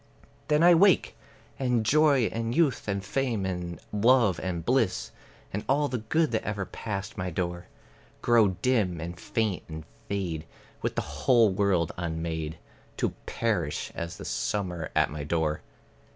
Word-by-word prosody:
Then 150 +2 +3
I 175 0 +8
wake; 190 +2 +4 0.4
and 125 -4 +1
joy 145 +2 +4
and 115 +1 -2
youth 155 -9 +2
and 100 -1 -2
fame 120 -4 -1
and 90 -2 -4
love 115 -3 +4
and 85 -3 -3
bliss, 95 - +1 0.4
And 100 - -2
all 145 +2 +3
the 125 - -2
good 155 +8 +1
that 110 -1 0
ever 105 -2 -2
passed 100 +1 -5
my 90 0 -2
door, 85 0 -3 0.6
Grow 120 -3 +5 0.2
dim, 105 -10 +2
and 85 +2 -6
faint 110 -5 -1
and 80 0 -6 0.3
fade, 85 -6 -3 0.3
with - - -2
the - - +1
whole 115 -5 +3
world 95 -4 +1
unmade, 80 -2 -3 0.4
To - - +1 0.2
perish - - -1
as 85 0 -5
the - - -8
summer 90 -6 -2
at - - +3
my 75 -1 -5
door. 75 0 0
100 Hz, 150 wpm, -28 LUFS, 85-120 Hz, 0.6 s, I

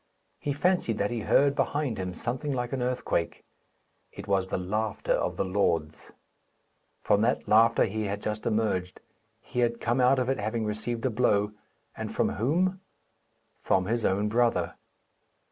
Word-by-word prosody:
He 145 - -2
fancied 145 - +1
that 100 +2 0
he 120 - -2
heard 140 +6 +3
behind 145 -8 -1
him 90 -1 -4
something 125 - -3
like 125 -2 -2
an 130 - -1
earthquake. 125 -9 -2 0.7
It - - -10
was 95 -1 +1
the - - -1
laughter 105 +4 -1
of - - -1
the - - 0
Lords. 85 -5 -1 0.9
From 100 - +3
that 115 +3 +1
laughter 115 +2 +5
he 110 +1 -3
had 100 0 -3
just 105 0 -3
emerged. 105 -5 -1 0.4
He 125 - -5
had 120 -1 +1
come 120 +2 +1
out 130 +2 +5
of 125 -1 0
it, 135 - 0
having 110 +2 -2
received 110 +3 -3
a 130 - +1
blow, 105 -3 +2 0.4
and - - -5
from - - +1
whom? 180 - 0 0.8
From 95 -1 +1
his 115 +3 -1
own 100 +2 +1
brother! 115 -6 +1
110 Hz, 160 wpm, -28 LUFS, 100-125 Hz, 0.9 s, laughter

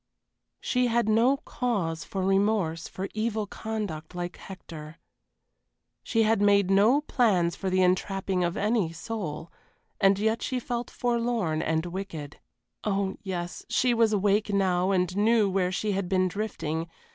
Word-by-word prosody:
She 250 -1 +1
had 235 -1 +1
no 235 +5 +4
cause 195 -13 -2
for 190 -1 -3
remorse 195 -4 +1
for 190 +1 -5
evil 220 0 -1
conduct 200 -7 -5
like 175 0 -4
Hector. 160 -5 -10 1.0
She 225 -1 +1
had 220 -1 +2
made 200 -2 +4
no 215 +9 +5
plans 195 - +2
for 190 - -3
the 185 0 +3
entrapping 185 0 0
of 175 0 -1
any 210 -5 +1
soul, 165 -4 -5 0.5
and 195 -2 +4
yet 220 +2 0
she 255 - -1
felt 240 0 -4
forlorn 235 -9 0
and 160 +1 0
wicked. 170 -5 -6 0.4
Oh 195 -2 -1
yes, 175 -3 -5
she 250 -1 +2
was 230 -2 +3
awake 205 +1 +2
now 185 -2 +2
and 180 -1 +1
knew 215 +1 +3
where 185 -1 0
she 210 +3 -1
had 195 -2 -2
been 185 -1 +2
drifting. 165 -5 -3
195 Hz, 145 wpm, -27 LUFS, 180-220 Hz, 1.0 s, no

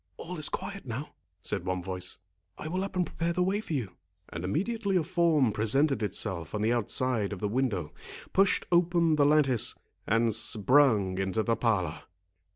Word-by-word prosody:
"All 175 0 -7
is 155 - +4
quiet 195 -8 -6
now," 125 +6 -5 0.3
said - - -2
one 90 -1 -2
voice; 95 0 -5 0.4
"I - - -6
will 185 +4 -2
up 195 - -6
and 180 -1 +1
prepare 170 +1 -2
the 180 - +1
way 195 +3 0
for 170 - -6
you." 110 -11 -3 0.3
And 85 - -6
immediately 200 - -1
a 175 - +3
form 165 -7 +2
presented 125 +7 +1
itself 95 -3 -1
on 105 - -1
the 115 +2 +2
outside 120 -2 0
of 100 - -4
the 105 - -1
window, 100 - -1 0.4
pushed 195 0 +3
open 170 -2 +3
the 145 -1 +4
lattice, 140 -6 +3 0.3
and 115 +1 +2
sprung 110 -3 +3
into 95 +3 0
the 115 +2 +1
parlour. 90 -11 0
125 Hz, 175 wpm, -29 LUFS, 100-170 Hz, 0.4 s, is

